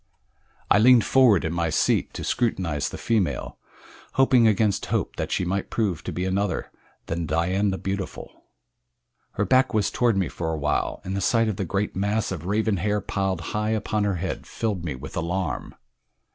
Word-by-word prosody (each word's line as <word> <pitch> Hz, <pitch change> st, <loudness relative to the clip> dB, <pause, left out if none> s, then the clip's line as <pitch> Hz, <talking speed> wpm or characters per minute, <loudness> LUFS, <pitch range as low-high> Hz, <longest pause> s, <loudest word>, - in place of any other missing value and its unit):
I 100 Hz, -, +6 dB
leaned 120 Hz, 0 st, +6 dB
forward 120 Hz, -10 st, +4 dB
in 80 Hz, -, -1 dB
my 85 Hz, -1 st, 0 dB
seat 75 Hz, -, +1 dB
to -, -, -5 dB
scrutinize 90 Hz, -, -1 dB
the -, -, -7 dB
female 110 Hz, -6 st, -1 dB, 0.5 s
hoping 130 Hz, -3 st, +5 dB
against 105 Hz, -1 st, +1 dB
hope -, -, -1 dB
that -, -, -3 dB
she 95 Hz, -, 0 dB
might 95 Hz, +2 st, -2 dB
prove 100 Hz, -8 st, -1 dB
to -, -, -3 dB
be 90 Hz, -, -2 dB
another 95 Hz, -1 st, -1 dB, 0.3 s
than 80 Hz, 0 st, -3 dB
Dian 90 Hz, +6 st, +1 dB
the 95 Hz, -, -2 dB
Beautiful. 95 Hz, 0 st, -6 dB, 0.9 s
Her -, -, 0 dB
back 130 Hz, -2 st, +3 dB
was 105 Hz, -2 st, +1 dB
toward 120 Hz, -4 st, +2 dB
me 95 Hz, -, +1 dB
for 80 Hz, -1 st, -4 dB
a 80 Hz, -, -2 dB
while, 75 Hz, 0 st, -1 dB
and 95 Hz, +1 st, -4 dB
the 100 Hz, -, -1 dB
sight 115 Hz, +1 st, +2 dB
of 105 Hz, -3 st, -2 dB
the 100 Hz, -, -2 dB
great 100 Hz, +4 st, -2 dB
mass 105 Hz, +3 st, 0 dB
of 90 Hz, -2 st, -5 dB
raven 105 Hz, 0 st, +1 dB
hair 105 Hz, +4 st, 0 dB
piled 95 Hz, -3 st, -2 dB
high 105 Hz, 0 st, 0 dB
upon 105 Hz, 0 st, -1 dB
her 100 Hz, -2 st, 0 dB
head 90 Hz, +2 st, -4 dB
filled 105 Hz, -6 st, -2 dB
me 75 Hz, -6 st, -3 dB
with 75 Hz, +5 st, -9 dB
alarm. 85 Hz, 0 st, -3 dB
95 Hz, 185 wpm, -25 LUFS, 85-110 Hz, 0.9 s, I